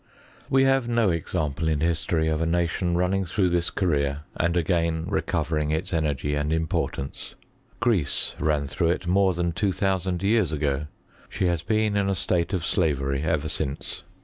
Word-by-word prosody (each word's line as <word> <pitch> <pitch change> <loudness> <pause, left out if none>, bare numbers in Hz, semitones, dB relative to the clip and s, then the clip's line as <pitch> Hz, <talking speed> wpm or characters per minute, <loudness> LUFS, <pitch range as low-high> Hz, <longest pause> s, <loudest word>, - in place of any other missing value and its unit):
We 135 0 +4
havs 135 -2 +3
no 115 -5 +2
example 80 -2 -2
in 80 -2 +1
history 80 -1 +1
of 80 0 0
a 80 - +1
nation 85 +1 0
running 95 +2 +1
throagh 90 +1 0
this 85 -1 +1
career 70 -6 0
and 85 +1 +1
again 85 -1 +1
recovering 80 -5 -1
its 80 +4 -2
energy 75 -3 0
and 75 +1 -1
import 80 -1 -1
ance. 70 0 -7 0.4
Greece 110 - 0
ran 75 -1 +1
through 80 +4 0
it 90 +1 -1
more 95 +1 +3
than 85 0 0
two 105 +3 0
dioa 95 0 0
sand 90 -1 -3
years 105 -4 +2
ago: 75 -1 -1 0.4
she - - -1
has 85 -2 +1
been 110 +3 +1
in 100 -1 +1
a 100 - +1
state 90 -1 0
of 90 -4 -1
slavery 70 -5 +1
ever 80 -1 0
since. 70 -2 -3
85 Hz, 175 wpm, -25 LUFS, 75-95 Hz, 0.4 s, We